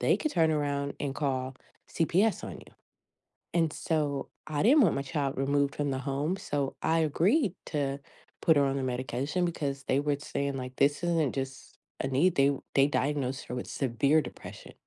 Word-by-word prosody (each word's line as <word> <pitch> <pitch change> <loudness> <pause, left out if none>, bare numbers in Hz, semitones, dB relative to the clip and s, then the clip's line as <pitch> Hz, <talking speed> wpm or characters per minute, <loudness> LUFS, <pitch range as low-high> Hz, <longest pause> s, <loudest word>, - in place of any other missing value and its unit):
they - - +3
could 310 - -2
turn 165 -3 +3
around 145 -1 -1
and 140 -2 -1
call 130 -2 -1 0.3
CPS 185 +5 +1
on - - -7
you, - - -17 0.8
and 165 -3 +2
so, 145 -4 -1 0.2
I 150 +1 -1
didn't 280 +6 +6
want 180 - +4
my 140 - -1
child 135 0 -2
removed 140 +1 +1
from 145 -2 -1
the 130 - -2
home, 140 +7 -1
so 145 -7 -2
I 165 +1 +2
agreed 185 - +2
to 140 -2 -1 0.4
put 160 -2 +5
her 140 - +4
on 135 0 0
the 135 - -2
medication, 130 +7 -1
because 140 -5 -3
they 135 - +2
were 145 0 +1
j 140 - -13
saying, 140 -1 -2
like, 130 0 -6
"This 145 +4 +2
isn't 165 -6 +1
just 135 0 -6 0.2
a - - -1
need." 145 +7 +3
They 140 +1 +4 0.2
they 135 0 +6
diagnosed 140 -2 -1
her 125 - -4
with 125 - -4
severe 140 +4 +2
depression." - - -10
140 Hz, 190 wpm, -29 LUFS, 135-160 Hz, 0.8 s, didn't